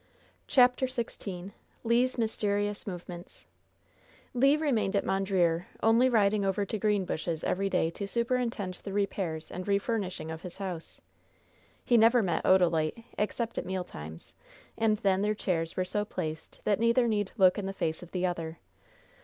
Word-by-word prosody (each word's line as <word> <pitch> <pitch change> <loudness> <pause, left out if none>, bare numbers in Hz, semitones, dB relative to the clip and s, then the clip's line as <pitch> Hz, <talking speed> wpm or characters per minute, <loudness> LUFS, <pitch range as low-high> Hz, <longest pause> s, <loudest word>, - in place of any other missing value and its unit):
CHAPTER 250 0 +4
XVI 200 -7 -5 0.3
LE'S 245 +3 +2
MYSTERIOUS 205 -2 -1
MOVEMENTS 175 -1 -8 0.9
Le 275 +4 +4
remained 230 -11 +1
at 200 - +1
Mondreer, 185 -3 +1 0.2
only 230 +3 +5
riding 210 -3 +3
over 195 +1 0
to 215 +2 -3
Greenbushes 185 -6 -1
every 195 +1 0
day 165 -3 +1
to 200 +4 -5
superintend 235 -5 -1
the 195 - -6
repairs 190 -5 -2
and 180 +2 -6
refurnishing 200 -4 -1
of 160 0 -6
his 180 0 -8
house. 185 -4 -6 0.8
He 240 - +4
never 230 +1 +5
met 175 -3 0
Odalite 175 +1 +3 0.2
except 230 +2 -1
at - - -5
meal 185 -1 -2
times, 80 - -10 0.4
and 220 -1 +2
then 195 -1 +2
their 210 +1 +1
chairs 165 -5 -2
were 185 - +1
so 205 +3 -1
placed 160 -6 -6
that 205 -1 +1
neither 235 +1 +3
need 205 -3 0
look 185 -1 +5
in 195 - -3
the - - -2
face 160 -4 -2
of 180 - -10
the 180 0 -1
other. 165 -2 -3
200 Hz, 155 wpm, -29 LUFS, 180-225 Hz, 0.9 s, only